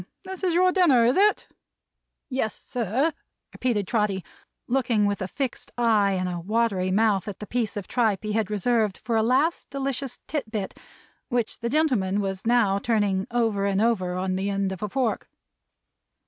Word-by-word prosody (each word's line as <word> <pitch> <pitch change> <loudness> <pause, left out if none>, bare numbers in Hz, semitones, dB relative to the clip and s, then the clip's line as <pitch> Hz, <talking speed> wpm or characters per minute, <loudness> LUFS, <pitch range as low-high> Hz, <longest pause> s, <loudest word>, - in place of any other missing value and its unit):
this 380 0 -7
is 355 -3 +1
your 365 +1 +4
dinner, 310 -11 +4
is 245 +3 +3
it?" 415 +2 +3 0.8
"Yes, 255 -6 -2
sir," 250 - -1 0.4
repeated 225 -6 0
Trotty, 205 -4 0 0.4
looking 240 -5 +2
with 205 -1 -1
a 185 - -2
fixed 260 +6 -4
eye 215 -4 +3
and 185 -1 -1
a 175 -1 -3
watery 200 0 0
mouth 205 -1 +2
at 205 - -5
the 210 - -7
piece 225 -1 -2
of 200 - -5
tripe 220 -6 +1
he 215 - -3
had 215 -1 0
reserved 215 -1 +1
for 235 - -1
a 220 - +4
last 265 +9 +1
delicious 275 -1 -3
tit 295 -8 -3
bit, 210 -4 -4 0.5
which 240 -3 -1
the 235 - -2
gentleman 240 -10 +1
was 195 +1 -3
now 225 -5 +3
turning 200 -4 0
over 225 -4 +1
and 195 -1 +1
over 200 -6 +1
on 185 0 -1
the 195 +1 -1
end 195 -1 -1
of 190 - -6
a 210 - -2
fork. 255 0 -1
220 Hz, 175 wpm, -25 LUFS, 195-250 Hz, 0.8 s, your